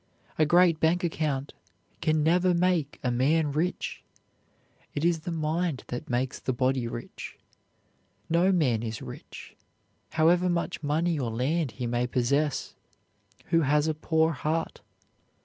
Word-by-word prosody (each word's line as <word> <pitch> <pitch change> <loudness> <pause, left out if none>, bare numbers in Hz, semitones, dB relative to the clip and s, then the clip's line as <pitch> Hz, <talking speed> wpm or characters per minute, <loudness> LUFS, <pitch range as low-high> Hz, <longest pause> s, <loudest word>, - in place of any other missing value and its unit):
A 155 - +4
great 175 -1 +5
bank 170 +3 +2
account 150 -5 -2 0.5
can 155 -2 +2
never 175 +3 +3
make 170 -5 +1
a 125 - +1
man 145 +5 +2
rich. 165 +5 -2 0.9
It 145 - -1
is 170 -1 +2
the 170 +3 -5
mind 160 -1 -1
that 125 - -5
makes 125 +1 -1
the 130 - -2
body 130 0 0
rich. 120 +1 -8 0.9
No 170 +3 +3
man 135 - +2
is 110 -1 -5
rich, - - -10 0.6
however 175 +3 +4
much 175 -1 -1
money 160 +2 0
or 125 -4 -1
land 130 +5 -1
he 125 - -4
may 120 +1 0
possess, 140 +4 0 0.8
who 165 - +4
has 150 +1 +2
a 160 - +1
poor 160 +1 +1
heart. 160 +3 -2
155 Hz, 140 wpm, -27 LUFS, 130-170 Hz, 0.9 s, great